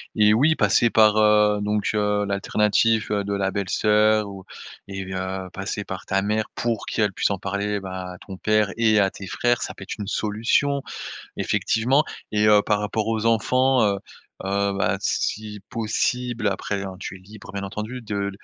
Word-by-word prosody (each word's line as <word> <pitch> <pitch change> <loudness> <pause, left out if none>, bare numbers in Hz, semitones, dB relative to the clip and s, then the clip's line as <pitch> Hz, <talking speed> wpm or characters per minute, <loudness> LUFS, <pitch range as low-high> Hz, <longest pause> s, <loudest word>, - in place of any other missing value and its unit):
et 105 -1 +5
oui, 150 +7 +4
passer 110 +2 +3
par, 110 -1 +5
heu, 105 -1 +4
donc 105 0 0
heu, 105 0 +1
l'alternative 105 +2 +1
de 100 -1 -1
la 95 -1 0
belle-sœur 105 +2 +2
ou 95 -1 -9 0.5
et 95 -1 -5
heu, 95 0 -4
passer 100 +1 -4
par 95 0 -6
ta 95 0 +1
mère 105 +2 0
pour 115 -2 -2
qu'elle 105 -3 0
puisse - - +1
en 100 - -2
parler, 100 +2 -2
ben, 95 -1 -7
à 90 -1 -6
ton 95 - -9
père 105 -1 +2
et 110 -2 +3
à 95 -1 +3
tes 95 - -9
frères. 120 +5 +1
Ça - - -4
peut - - -10
être - - -6
une 105 -2 -5
solution, 115 +7 0 0.5
effectivement 130 +6 +2 0.3
et 105 0 +3
heu, 105 -1 +6
par 105 -1 +1
rapport 105 +1 -2
aux 110 0 0
enfants, 125 +3 +3
heu 100 -1 +1 0.5
heu, 100 +1 0
bah, - - +1
si 105 -1 -2
possible- 115 +1 -1
après, 100 0 -2
hein, 95 -1 -6
tu 95 - -6
es - - -14
libre, 105 +3 -13
bien 100 0 -4
entendu- 110 +5 -5
de, 100 -2 -2
105 Hz, 180 wpm, -23 LUFS, 100-110 Hz, 0.5 s, heu